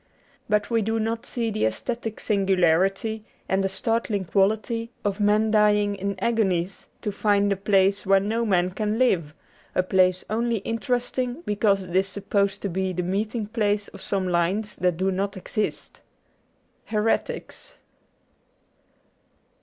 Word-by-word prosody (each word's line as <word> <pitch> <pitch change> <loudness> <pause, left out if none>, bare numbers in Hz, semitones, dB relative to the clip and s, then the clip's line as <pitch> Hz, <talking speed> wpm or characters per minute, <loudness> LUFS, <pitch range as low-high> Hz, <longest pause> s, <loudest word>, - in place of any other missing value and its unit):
But 210 +2 +1
we 230 -1 +3
do 225 +2 0
not 225 +1 -2
see 230 -2 -2
the 215 - -1
aesthetic 230 - -4
singularity 195 +2 +2 0.2
and 190 0 +1
the 195 - +1
startling 215 -1 -1
quality 215 +5 +1 0.2
of 200 0 -1
men 210 +1 +3
dying 210 -1 +4
in 200 0 -3
agonies 195 -4 0 0.2
to 210 - -1
find 205 0 +2
a - - -3
place 195 0 +2
where 195 0 +4
no 220 +4 -1
man 185 -4 +2
can 210 +3 -1
live 175 -11 +1 0.2
— - - -31
a 185 - +3
place 185 0 +2
only 230 +2 0
interest 245 +3 -1
ing 250 +4 -2
because 200 -2 +2
it 180 -1 -7
is 190 +1 +3
supposed 200 0 -1
to - - 0
be 190 0 -1
the 180 0 -2
meeting 210 +5 -1
place 205 -2 0
of - - -12
some 195 -2 -1
lines 185 +4 0
that 180 -2 +1
do 190 +2 +1
not 195 +1 -2
exist. 210 +3 -4 0.9
^ - - -23
Heretics. 220 0 -2
205 Hz, 155 wpm, -25 LUFS, 190-220 Hz, 0.9 s, dying